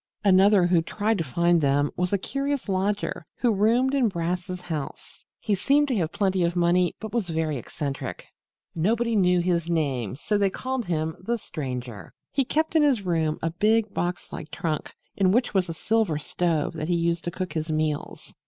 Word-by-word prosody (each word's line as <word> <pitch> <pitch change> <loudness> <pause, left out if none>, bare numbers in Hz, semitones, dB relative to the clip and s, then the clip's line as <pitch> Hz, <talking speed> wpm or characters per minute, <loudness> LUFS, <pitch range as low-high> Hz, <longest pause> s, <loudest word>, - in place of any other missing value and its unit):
Another 195 -1 +5
who 175 -1 +3
tried 210 +5 -1
to - - +1
find 170 +4 +2
them 145 0 +2
was 180 0 -1
a 200 - +3
curious 275 +6 -2
lodger 195 -1 -1
who 240 -3 +2
roomed 235 +6 +3
in 270 -4 +3
Brass's 180 0 -3
house. 160 -5 -6 0.2
He 215 - -1
seemed 280 +9 +3
to 255 - +1
have 165 -4 0
plenty 190 -1 +1
of 170 +1 0
money 175 +1 +2
but 220 0 -7
was 225 -7 -1
very 160 -2 -1
eccentric. 135 +3 -5 0.5
Nobody 225 +7 +1
knew 180 -3 +4
even 180 +1 +1
his 170 0 -1
name 140 - 0
and 130 - -8
so 210 +5 0
they 200 -1 +3
called 260 +3 -3
him 160 -2 -2
The 235 +6 -1
Stranger. 125 - -6 0.2
He 275 - +2
kept 315 +5 -1
in 320 - +6
his 270 -8 +3
room 160 -4 0
a 165 - 0
big 215 +4 +2
box 175 0 -3
like 155 - -7
trunk, 160 -3 -3 0.2
in 190 -2 +3
which 245 +3 +1
was 185 -3 +1
a - - -2
silver 215 -4 +1
stove 160 0 -1
that 155 -1 -4
he 175 - +1
used 170 0 0
to - - 0
cook 185 +1 -5
his 160 0 -3
meals. 155 -1 -2
180 Hz, 200 wpm, -25 LUFS, 160-210 Hz, 0.5 s, in